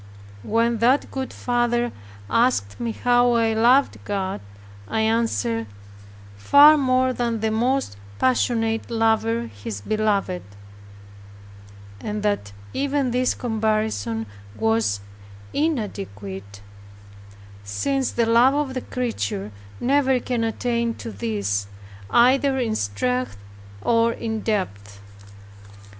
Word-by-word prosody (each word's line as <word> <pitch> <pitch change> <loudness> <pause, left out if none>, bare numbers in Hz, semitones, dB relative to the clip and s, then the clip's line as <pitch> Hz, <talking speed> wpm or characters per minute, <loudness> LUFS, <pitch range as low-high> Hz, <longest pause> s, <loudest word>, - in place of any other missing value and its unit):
When 230 - +1
that 250 +5 +2
good 265 -1 -4
father 240 -1 0 0.4
asked 230 - +1
me 235 -1 -2
how 245 +1 +3
I 225 -1 +2
loved 245 +5 +3
God, 190 - -3 0.5
I 220 - -1
answered, 120 - 0 0.7
"Far 285 - +7
more 255 -2 +2
than 235 -2 -1
the 220 0 0
most 245 - 0 0.2
passionate 225 - +1
lover 220 - +1
his 100 -1 -7
beloved; 200 - 0 1.6
and 210 - -4
that 205 - -1 0.2
even 280 -2 0
this 250 +1 +1
comparison 215 - -1 0.3
was 110 -2 +1 0.5
inadequate, 100 - -3 1.0
since 265 - -1
the 235 - +1
love 235 +4 +5
of 290 -3 -1
the 255 - -3
creature 105 - -3 0.3
never 265 0 +2
can 240 -1 -2
attain 235 0 -1
to 115 - -7
this, 100 -1 -2 0.4
either 265 +3 +4
in 230 -4 0
strength 110 - -1 0.5
or 230 0 +3
in 220 -1 -3
depth." 100 - -3
225 Hz, 105 wpm, -23 LUFS, -, 1.6 s, Far